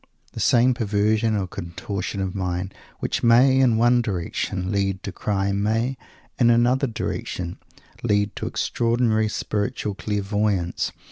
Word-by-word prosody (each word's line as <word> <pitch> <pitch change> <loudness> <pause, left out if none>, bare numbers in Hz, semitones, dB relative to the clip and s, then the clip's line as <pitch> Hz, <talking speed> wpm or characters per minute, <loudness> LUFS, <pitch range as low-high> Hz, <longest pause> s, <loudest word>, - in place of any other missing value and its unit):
The - - -6
same 125 +2 +4
perversion 110 -1 +1
or 100 - -1
contortion 95 +2 -5
of 95 -1 -2
mind 90 0 -3 0.3
which - - -1
may, 125 +3 +5
in 125 -4 +4
one 120 +1 +4
direction, 95 -2 -3
lead 100 -1 -1
to 100 - -4
crime 100 0 -1
may, 115 +5 0 0.4
in 120 -2 +5
another 120 +3 +3
direction, 90 -5 -4 0.4
lead 105 -2 +1
to - - -3
extraordinary 115 -2 +1
spiritual 105 0 -2
clairvoyance. 100 -3 -1
105 Hz, 130 wpm, -23 LUFS, 95-115 Hz, 0.4 s, may